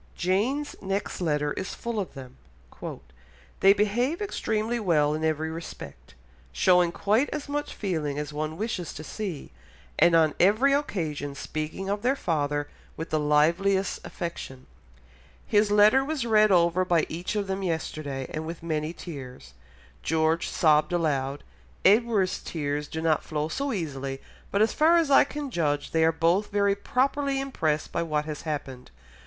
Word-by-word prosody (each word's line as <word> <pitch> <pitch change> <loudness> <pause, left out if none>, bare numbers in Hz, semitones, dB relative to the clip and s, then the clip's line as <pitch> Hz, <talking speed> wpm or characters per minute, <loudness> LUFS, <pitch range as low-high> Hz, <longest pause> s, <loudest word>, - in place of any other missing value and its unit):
Jane's 225 +11 0
next 195 0 -3
letter 150 -3 0
is 190 - -5
full 235 -2 -3
of 190 - -5
them. 130 -1 -10 1.2
"They 195 - +7
behave 225 - +1
extremely 235 - -1
well 155 -7 +2
in 155 +1 -3
every 160 0 0
respect, 165 - -9 0.4
showing 180 - +4
quite 215 +10 +1
as 300 -1 -5
much 290 +1 -3
feeling 155 -8 -2
as 150 0 -4
one 155 +1 -3
wishes 205 -6 -3
to 155 - -7
see, 180 - -6 0.5
and 170 - +6
on 160 -2 +4
every 215 +10 +4
occasion 160 - -2
speaking 155 +6 -5
of 205 +1 -1
their 255 +4 +2
father 145 - -1 0.3
with 160 - -6
the 155 - +2
liveliest 170 +7 +2
affection. 135 -7 -6 0.8
His 210 0 +3
letter 210 +6 +5
was 285 -3 -2
read 215 -2 +4
over 175 0 +4
by 175 -3 +2
each 175 +6 -4
of 205 -1 0
them 195 0 -3
yesterday 155 -6 -3
and 155 - -3
with 165 0 -7
many 155 -1 -2
tears; 130 - -9 0.5
George 160 +1 +1
sobbed 155 +1 +3
aloud, 145 -5 -1 0.4
Edward's 210 -2 +3
tears 145 -2 -3
do 160 +1 -5
not 160 -2 +2
flow 150 0 -3
so 280 - -2
easily, 135 - -4 0.3
but 200 +2 +3
as 220 - +1
far 325 +3 +5
as 325 -4 +2
I 275 - +7
can 290 -2 -6
judge, 145 -6 -1
they 160 0 +2
are 160 - +5
both 170 +5 +1
very 200 0 +3
properly 270 +6 0
impressed 160 - -1
by 170 - -1
what 155 -2 -1
has 150 -1 -5
happened.... 140 -5 -5
170 Hz, 160 wpm, -26 LUFS, 150-210 Hz, 1.2 s, They